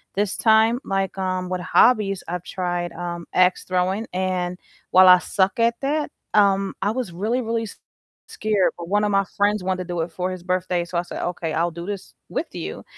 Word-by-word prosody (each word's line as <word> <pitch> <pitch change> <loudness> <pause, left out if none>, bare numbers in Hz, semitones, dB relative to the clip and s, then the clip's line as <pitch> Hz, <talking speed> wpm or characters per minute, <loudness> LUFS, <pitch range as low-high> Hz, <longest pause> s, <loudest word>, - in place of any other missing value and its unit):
this 200 0 0
time, 220 +1 +4
like, 195 -1 -1
um, 185 -1 -2
with 185 -1 -2
hobbies 210 -1 +3
I've 180 0 -4
tried, 175 -2 -3
um, 175 -1 -5
ax 185 0 +3
throwing 185 +4 0
and 180 -1 -1 0.3
while 185 0 +7
I 180 0 +9
suck 190 +3 0
at 230 0 +3
that, 295 +2 -1 0.2
um, 195 -1 +3
I 200 - +1
was 235 -5 -3
really, 215 +9 -1
really 230 -1 -1
s 220 - -8 0.5
scared, 210 -3 0
but 170 - -6
one 205 +2 +2
of 210 - +1
my 195 0 +2
friends 205 -1 +2
wanted 185 0 -1
to - - -14
do 170 - -1
it 165 +1 -4
for 180 +2 -3
his 185 -1 -6
birthday, 180 -1 -1
so 175 0 -4
I - - -2
said, - - -7
"Okay, 170 -2 -3
I'll 170 +2 +1
do 170 +1 -7
this 200 -2 -6 0.2
with - - -2
you," - - -6
185 Hz, 210 wpm, -23 LUFS, 180-210 Hz, 0.5 s, I